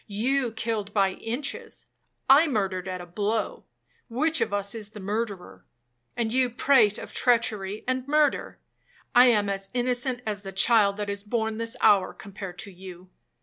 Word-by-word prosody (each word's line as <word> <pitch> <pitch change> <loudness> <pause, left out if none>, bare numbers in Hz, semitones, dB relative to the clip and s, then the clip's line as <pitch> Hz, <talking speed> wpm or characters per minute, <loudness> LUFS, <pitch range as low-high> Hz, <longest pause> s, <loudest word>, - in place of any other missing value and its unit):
You 240 +4 0
killed 220 -2 -3
by 195 -2 +3
inches,—I 280 - -1
murdered 195 - -1
at 185 -1 -4
a - - -8
blow,—which 210 - -3
of - - 0
us 200 0 -2
is 215 -3 -7
the 215 - -11
murderer?—And 190 - -6
you 255 -1 +2
prate 230 -4 +3
of - - -9
treachery 215 -4 0
and 255 0 -1
murder? 300 0 +1 0.6
I 250 +1 +8
am 210 -4 +3
as 195 -1 -3
innocent 245 0 0
as 210 -2 -3
the 195 -1 -8
child 200 0 +4
that 210 -1 -3
is 200 0 -5
born 220 0 -2
this 230 0 -3
hour, 200 -4 +4
compared 195 -2 -9
to 200 - -7
you. 185 0 -12
210 Hz, 150 wpm, -26 LUFS, 195-245 Hz, 0.6 s, I